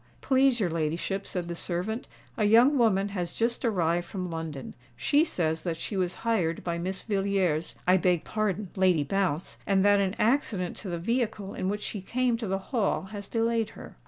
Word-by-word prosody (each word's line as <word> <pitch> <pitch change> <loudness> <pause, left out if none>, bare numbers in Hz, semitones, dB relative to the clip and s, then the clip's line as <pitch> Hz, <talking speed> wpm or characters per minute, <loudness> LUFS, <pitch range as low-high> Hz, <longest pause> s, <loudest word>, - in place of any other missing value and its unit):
"Please 265 -2 +3
your 185 -6 +1
ladyship," 165 +5 -2
said 180 -2 -3
the 170 - -3
servant, 180 +7 -3 0.3
"a - - +1
young 235 +7 +6
woman 205 -4 +3
has 180 -4 -3
just 235 +2 0
arrived 175 -6 +1
from 185 -3 -4
London. 160 -4 -5 0.2
She 285 - +3
says 160 - -1
that 170 -3 -2
she 200 - -4
was 180 -2 0
hired 180 -8 +1
by 170 -1 -2
Miss 185 +2 -3
Villiers—I 190 -4 +1
beg 180 -2 +2
pardon 210 -3 -2
Lady 185 -5 +3
Bounce—and 190 +3 0
that 205 0 +5
an 195 0 0
accident 215 -7 +1
to 200 - -6
the 170 - -2
vehicle 215 0 -1
in 185 - -2
which 210 +1 -3
she 205 - -4
came 245 +4 0
to 225 -2 -4
the 195 +1 0 0.2
Hall 220 -7 +1
has 205 -1 -6
delayed 230 -1 0
her." - - -10
195 Hz, 185 wpm, -28 LUFS, 175-220 Hz, 0.3 s, young